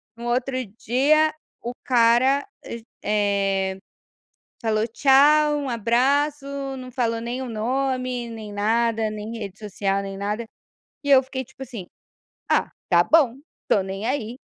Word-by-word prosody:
no 235 +1 -9
outro 255 +2 0 0.2
dia 305 +6 +3 0.3
o 240 +1 -4
cara, 250 +4 +3 0.2
eh 230 -1 -7 0.9
eh, - - -12 0.8
falou 220 -1 +1
tchau, 295 +4 +5
um 285 -2 -3
abraço, 265 +6 +1 0.3
não 255 -1 -8
falou 230 -3 -1
nem 240 +2 -4
o 260 - -4
nome, 255 +1 -1
nem 220 -2 -8
nada, 225 +1 +1
nem 215 +2 -6
rede 200 -2 -7
social, 200 -1 -2
nem 195 0 -6
nada. 210 +3 -3 0.6
E 285 - -1
eu 265 -1 +7
fiquei 260 0 -5
tipo 265 - -13
assim: 235 -8 -7 0.6
"Ah - - +2 0.2
tá - - +5
bom, 280 -7 +4 0.3
estou 200 - +2
nem 195 +3 -5
aí". 245 -2 -2
240 Hz, 140 wpm, -23 LUFS, 220-265 Hz, 0.9 s, eu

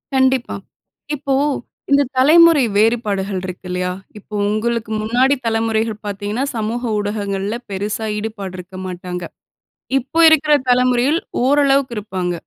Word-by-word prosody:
கண்டிப்பா. 260 -1 +2 0.6
இப்போ 275 -1 -1 0.6
இந்த 280 0 +5 0.2
தலைமுறை 320 +2 +6
வேறுபாடுகள் 205 -3 +1
இருக்கு 180 0 -8
இல்லையா? 180 0 -2 0.2
இப்போ 210 +1 -10
உங்களுக்கு 220 +1 -1
முன்னாடி 250 +6 +2
தலமுறைகள் 225 -1 0
பார்த்தீங்கன்னா, 205 +4 -3
சமூக 225 +2 -2 0.2
ஊடகங்கள்ல 205 0 -2
பெருசா 205 +3 -3
ஈடுபாடு 210 -3 -5
இருக்க 180 +1 -10
மாட்டாங்க. 180 -1 -6 0.7
இப்ப 270 +6 0
இருக்கிற 310 -1 +4 0.2
தலைமுறையில் 250 +4 +3 0.2
ஓரளவுக்கு 275 -1 +3
இருப்பாங்க. 185 -4 -3
220 Hz, 110 wpm, -18 LUFS, 200-260 Hz, 0.7 s, தலைமுறை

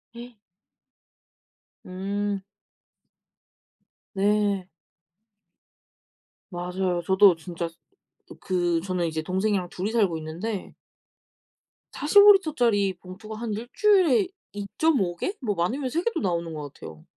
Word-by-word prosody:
예. 240 0 -10 1.5
음. 200 +2 -3 1.7
네. 200 -1 +1 1.8
맞아요. 180 0 -2
저도 190 -1 +6
진짜 170 0 -5 0.7
그 175 -3 0
저는 180 -1 -2
이제 160 -1 -3
동생이랑 190 +2 -1
둘이 190 +5 -3
살고 200 -8 +2
있는데 175 +7 -5 1.2
45L 390 0 +6
짜리 205 -7 +2
봉투가 185 +5 -10
한 230 0 -4
1 225 +3 -5
주일에 380 - +4 0.3
2.5 205 - 0
개? 375 - -2
뭐 210 -6 -1
많으면 250 +11 -1
3 330 +6 -1
개도 450 -6 -1
나오는 170 -3 -2
것 150 -2 -7
같아요. 75 -1 -11
195 Hz, 175 characters per minute, -25 LUFS, 175-235 Hz, 1.8 s, 저도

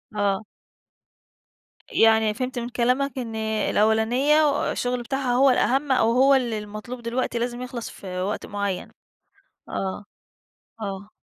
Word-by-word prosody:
آه. 200 0 0 1.5
يعني 220 -1 +4
فهمت 255 +2 -3
من 235 - -4
كلامك 255 +3 0
إن 230 -3 -4
الأولانية 220 +7 +2
الشغل 245 0 -1
بتاعها 265 +1 -1
هو 270 +2 +5
الأهم، 270 +2 +2
أو 230 -3 +3
هو 265 +3 +5
اللي 240 -4 0
المطلوب 215 +4 -8
دلوقتي 235 0 -2
لازم 240 +1 -3
يخلَص 250 -2 -5
في 180 -2 -6
وقت 200 +3 -2
معين. 200 -2 -3 0.8
آه، 195 +1 -3 0.8
آه. 200 0 -5
235 Hz, 125 wpm, -24 LUFS, 215-255 Hz, 1.5 s, هو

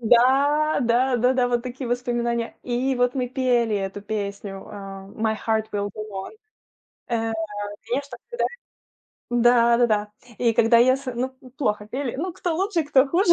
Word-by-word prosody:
Да, 275 +6 +4
да, 245 +2 +2
да-да, 250 +1 +2
вот 240 -1 0
такие 250 0 -5
воспоминания. 240 -1 -1
И 255 +2 0
вот 245 +1 +1
мы 250 -2 -1
пели 245 -4 +1
эту 195 +1 -4
песню, 200 -1 -5
э, - - -9 0.4
"My 220 -1 0
heart 220 -1 +1
will 205 0 -1
go 215 - -6
on". 190 0 -5 0.8
Э, 225 -1 -1 0.6
конечно, 265 0 -3
когда 475 - -1 0.9
Да, 240 0 +5
да-да. 215 -3 +2 0.3
И 235 -2 +2
когда 230 +1 +5
я 255 +2 +5
с 275 - -11
ну, 255 +2 -1 0.3
плохо 210 -6 0
пели, 260 +3 -3
ну, 360 +5 -3
кто 345 0 -2
лучше, 380 -2 +1
кто 280 -2 +4
хуже. 350 +2 +4
240 Hz, 160 wpm, -24 LUFS, 225-260 Hz, 0.9 s, Да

